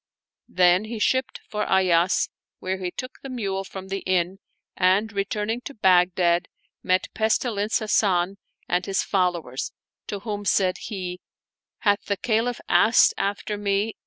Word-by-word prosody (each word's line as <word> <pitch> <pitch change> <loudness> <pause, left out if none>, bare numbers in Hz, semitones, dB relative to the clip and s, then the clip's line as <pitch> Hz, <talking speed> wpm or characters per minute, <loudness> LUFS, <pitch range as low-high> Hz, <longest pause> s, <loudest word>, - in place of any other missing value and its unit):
Then 180 +2 +4
he 225 +1 -5
shipped 260 +4 0
for 210 0 -2
Ayas, 180 -2 +3 0.3
where 190 +1 -3
he 180 -1 -2
took 255 +8 -8
the 270 - -8
mule 200 -6 -2
from 190 0 -9
the 195 0 -2
inn 185 0 0 0.4
and, 195 +4 +2
re 200 0 +1
turning 210 +4 -3
to 280 - -7
Baghdad 180 -3 +3 0.3
met 185 0 0
Pestilence 220 -1 +1
Hasan 195 -4 +1 0.3
and 180 0 0
his 195 -1 +1
fol 180 -3 +2
lowers, 135 -7 -5 0.4
to 200 -2 -5
whom 205 -1 -4
said 185 -2 +2
he, 185 -4 -5 0.3
" - - -69
Hath 205 -1 +3
the 200 - -1
Caliph 230 +2 0
asked 230 +2 +5
after 205 +1 -2
me 205 +2 0
195 Hz, 155 wpm, -24 LUFS, 185-215 Hz, 0.4 s, asked